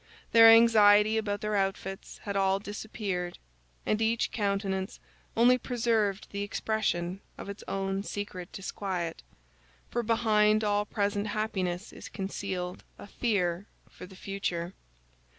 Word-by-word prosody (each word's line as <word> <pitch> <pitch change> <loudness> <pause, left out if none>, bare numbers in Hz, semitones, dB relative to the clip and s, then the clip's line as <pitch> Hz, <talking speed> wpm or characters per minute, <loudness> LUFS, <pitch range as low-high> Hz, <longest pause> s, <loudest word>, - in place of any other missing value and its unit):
Their 225 0 +9
anxiety 215 -2 +7
about 205 -2 -2
their 210 0 -1
outfits 195 -1 -3
had 200 -1 -4
all 195 0 +3
disappeared, 200 -3 -4 0.5
and 215 - 0
each 225 +1 +1
countenance 195 -2 -2 0.4
only 250 +2 +5
preserved 225 -5 0
the 200 - -4
expression 200 -3 -1 0.2
of - - -8
its 200 - -7
own 195 0 -2
secret 200 -3 -6
disquiet—for 170 - -6
behind 215 -2 +3
all 205 0 +1
present 205 0 -1
happiness 200 -3 -2
is - - -10
concealed 190 -2 -4
a - - -10
fear 200 -4 -1 0.2
for 180 - -11
the 190 - -14
future. 185 -2 -3
200 Hz, 120 wpm, -29 LUFS, 190-215 Hz, 0.5 s, Their